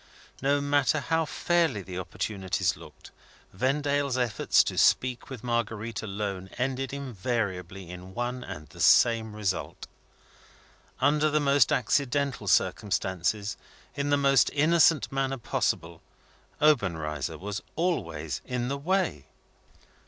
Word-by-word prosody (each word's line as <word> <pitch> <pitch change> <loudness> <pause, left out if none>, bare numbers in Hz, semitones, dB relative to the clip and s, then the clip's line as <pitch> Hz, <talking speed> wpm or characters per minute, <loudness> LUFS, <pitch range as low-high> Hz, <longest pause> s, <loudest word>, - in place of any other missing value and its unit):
No 140 +2 +2
matter 145 +1 +2
how 160 +4 0
fairly 160 - 0
the 90 0 -6
opportunities 95 0 -2
looked, - - -14 0.4
Vendale's 140 +4 0
efforts 120 -4 +3
to - - -4
speak 125 +1 +2
with 130 -5 -8
Marguerite 115 -2 -2
alone 100 -2 -4
ended 130 +1 -2
invariably 105 -8 -3
in 90 +2 -10
one 125 +1 -3
and 75 -8 -8
the - - -15
same 110 -2 +4
result. 100 -4 -3 1.2
Under 150 +1 +3
the 150 0 +2
most 140 -4 +3
accidental 140 +3 0
circumstances, 100 +1 0 0.4
in 140 0 -2
the 145 - +4
most 140 -2 +4
innocent 160 0 +4
manner 135 0 -1
possible, 85 -7 -2 0.6
Obenreizer 80 - +1
was 100 +1 -5
always 85 - -2
in 125 0 -3
the 140 0 -2
way. 175 - -1
125 Hz, 115 wpm, -27 LUFS, 95-140 Hz, 1.2 s, same